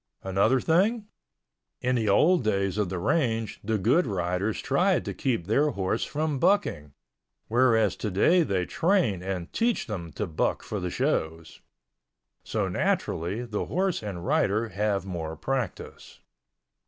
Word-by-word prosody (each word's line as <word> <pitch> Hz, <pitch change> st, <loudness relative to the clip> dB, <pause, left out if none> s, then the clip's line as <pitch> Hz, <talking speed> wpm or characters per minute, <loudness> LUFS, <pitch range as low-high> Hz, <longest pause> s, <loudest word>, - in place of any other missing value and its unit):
Another 100 Hz, +7 st, +2 dB
thing, 205 Hz, -, +2 dB, 0.7 s
in 125 Hz, +1 st, 0 dB
the 115 Hz, -4 st, +1 dB
old 160 Hz, -, +4 dB
days 100 Hz, -2 st, 0 dB
of 100 Hz, -4 st, 0 dB
the 95 Hz, -, -3 dB
range 115 Hz, -, 0 dB
the 110 Hz, +1 st, 0 dB
good 125 Hz, -, +2 dB
riders 95 Hz, +1 st, -1 dB
tried 180 Hz, +6 st, +1 dB
to -, -, -3 dB
keep 120 Hz, -11 st, -1 dB
their 140 Hz, -, +2 dB
horse 95 Hz, -8 st, -1 dB
from 150 Hz, -1 st, -2 dB
bucking, 75 Hz, -, +1 dB, 0.6 s
whereas 115 Hz, -4 st, +3 dB
today 110 Hz, -, +2 dB
they 95 Hz, -, 0 dB
train 165 Hz, -, +1 dB
and 90 Hz, -2 st, -5 dB
teach 235 Hz, 0 st, +1 dB
them 90 Hz, -7 st, -6 dB
to 105 Hz, -, -2 dB
buck 80 Hz, -4 st, -1 dB
for 105 Hz, -, -4 dB
the 90 Hz, -1 st, -3 dB
shows. 80 Hz, -1 st, -2 dB, 0.8 s
So -, -, -1 dB
naturally 100 Hz, +9 st, -1 dB
the 110 Hz, -3 st, -3 dB
horse 185 Hz, +2 st, 0 dB
and 95 Hz, -5 st, -6 dB
rider 110 Hz, +5 st, +1 dB
have 100 Hz, 0 st, -1 dB
more 80 Hz, -4 st, -5 dB
practice. 125 Hz, -, -5 dB
105 Hz, 140 wpm, -27 LUFS, 95-135 Hz, 0.8 s, old